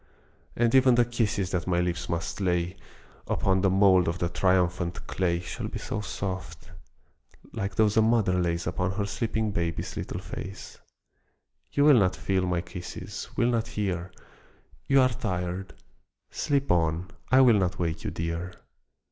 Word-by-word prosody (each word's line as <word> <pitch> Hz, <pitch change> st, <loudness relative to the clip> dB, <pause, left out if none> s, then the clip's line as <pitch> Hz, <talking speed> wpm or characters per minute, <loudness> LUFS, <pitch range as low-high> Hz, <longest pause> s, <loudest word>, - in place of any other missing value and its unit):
And 120 Hz, -1 st, +2 dB
even 130 Hz, -2 st, +6 dB
the 120 Hz, 0 st, +4 dB
kisses 105 Hz, -5 st, -1 dB
that 90 Hz, -1 st, -2 dB
my 90 Hz, -1 st, +2 dB
lips 85 Hz, -1 st, -2 dB
must 85 Hz, +4 st, -3 dB
lay 90 Hz, -1 st, 0 dB, 0.5 s
Upon 95 Hz, -1 st, +1 dB
the 95 Hz, -, +3 dB
mould 95 Hz, -2 st, +5 dB
of 85 Hz, +1 st, -1 dB
the 85 Hz, -1 st, -1 dB
triumphant 90 Hz, -1 st, 0 dB
clay 85 Hz, -2 st, 0 dB
Shall 90 Hz, -, -5 dB
be -, -, -6 dB
so 105 Hz, -, -4 dB
soft 95 Hz, -3 st, -5 dB, 0.8 s
like 100 Hz, -3 st, -3 dB
those 110 Hz, 0 st, +3 dB
a -, -, +7 dB
mother 110 Hz, -4 st, +3 dB
lays 85 Hz, -1 st, -1 dB
Upon 90 Hz, +2 st, -1 dB
her 100 Hz, +1 st, -1 dB
sleeping 110 Hz, +1 st, -1 dB
baby's 85 Hz, -3 st, -2 dB
little -, -, -4 dB
face 95 Hz, +1 st, -8 dB, 0.9 s
You 145 Hz, -, +2 dB
will 145 Hz, -5 st, +7 dB
not 95 Hz, -2 st, +2 dB
feel 95 Hz, -1 st, 0 dB
my 90 Hz, -1 st, 0 dB
kisses, 90 Hz, -1 st, -7 dB
will 120 Hz, -, +3 dB
not 115 Hz, -1 st, 0 dB
hear; 95 Hz, -5 st, -3 dB, 0.8 s
You 135 Hz, -1 st, +5 dB
are 130 Hz, -, +4 dB
tired: 95 Hz, -4 st, -4 dB, 0.6 s
sleep 140 Hz, -1 st, 0 dB
on, 85 Hz, +1 st, +1 dB, 0.2 s
I 130 Hz, +1 st, +7 dB
will 120 Hz, -5 st, +6 dB
not 95 Hz, -1 st, 0 dB
wake 80 Hz, -2 st, -2 dB
you, -, -, -2 dB
dear! 85 Hz, +2 st, -4 dB
95 Hz, 160 wpm, -27 LUFS, 85-110 Hz, 0.9 s, a